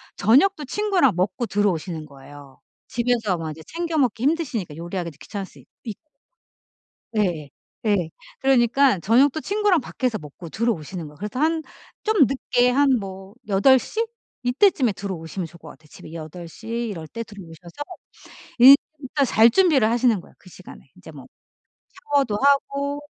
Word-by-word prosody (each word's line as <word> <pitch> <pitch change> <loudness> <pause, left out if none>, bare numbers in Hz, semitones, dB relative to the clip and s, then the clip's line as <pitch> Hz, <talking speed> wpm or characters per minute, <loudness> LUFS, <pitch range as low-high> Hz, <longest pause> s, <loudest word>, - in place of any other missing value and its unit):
저녁도 295 - +3
친구랑 380 - +2
먹고 195 +6 -1
들어오시는 175 -6 -1
거예요. 140 -1 -14 0.3
집에서 235 -6 0
뭐 160 -1 -5
이제 160 - -10
챙겨 335 -1 -3
먹기 245 -2 0
힘드시니까 265 - -1
요리하기도 170 -1 -5
귀찮을 200 -2 -6
수 - - -18
있고. 220 -4 -10 1.2
예. 170 -8 -1 0.4
예. 190 -6 +1 0.3
그러니까 260 -3 +3
저녁도 260 - +3
친구랑 405 -5 +1
밖에서 250 -3 -2
먹고 150 +1 -11
들어오시는 180 -7 -3
거예요. 150 - -14
그래서 210 +7 -5
한 320 +2 +1 0.4
좀 425 -9 +4
늦게 250 -1 +1
한 280 +3 +3
뭐 195 0 -9
8:00? 260 - +3 0.4
이때쯤에 250 - +3
들어오시면 180 -2 -5
좋을 170 +1 -14
것 - - -14
같아요. 155 - -16
집에 160 - -13
8:00 170 +5 -9
이럴 225 -9 -4
때 230 +6 -7
들어오셔서 175 - -10 1.2
일단 280 +1 -1
잘 230 -1 +5
준비를 295 - +3
하시는 235 -2 +2
거예요 - - -19
그 185 - -18
시간에. 180 -6 -14
이제 185 -3 -13
뭐 140 -4 -12 0.9
샤워도 270 -7 +2
하고 280 0 +1
220 Hz, 325 characters per minute, -23 LUFS, 175-275 Hz, 1.2 s, 잘